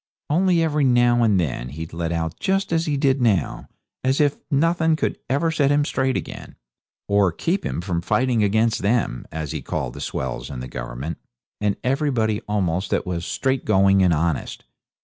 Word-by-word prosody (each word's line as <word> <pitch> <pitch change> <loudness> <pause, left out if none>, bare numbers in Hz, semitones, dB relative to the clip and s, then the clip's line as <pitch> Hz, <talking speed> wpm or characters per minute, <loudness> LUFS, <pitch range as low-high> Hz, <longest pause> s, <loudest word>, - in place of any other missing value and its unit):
Only 175 +1 +3
every 150 -2 +1
now 120 -2 +4
and 105 -5 +3
then 65 -6 -2
he'd 80 +4 -7
let 85 0 -2
out 80 0 -3
just 195 -2 0
as 165 0 +1
he 145 -2 0
did 135 -1 +2
now, 100 -10 +1 0.4
as 130 +1 +1
if 145 -2 +3
nothing 160 +2 +2
could - - -2
ever 145 +5 +1
set 145 -4 +2
him 145 0 +3
straight 130 -2 0
again, - - -7 0.5
or 100 -2 +3
keep 170 - -1
him - - -3
from 90 -2 -2
fighting 125 +4 +1
against 110 +3 +2
them, 105 - 0
as 80 -3 -4
he - - -4
called - - -3
the - - -8
swells 65 -1 -4
and 65 -3 -6
the - - -6
Government, 65 +5 -6 0.4
and 105 -1 0
everybody 125 -5 0
almost 95 -3 0
that - - 0
was 85 -2 -3
straightgoing 100 -8 +2
and 90 -2 +4
honest. 80 -1 -1
110 Hz, 180 wpm, -22 LUFS, 85-140 Hz, 0.5 s, now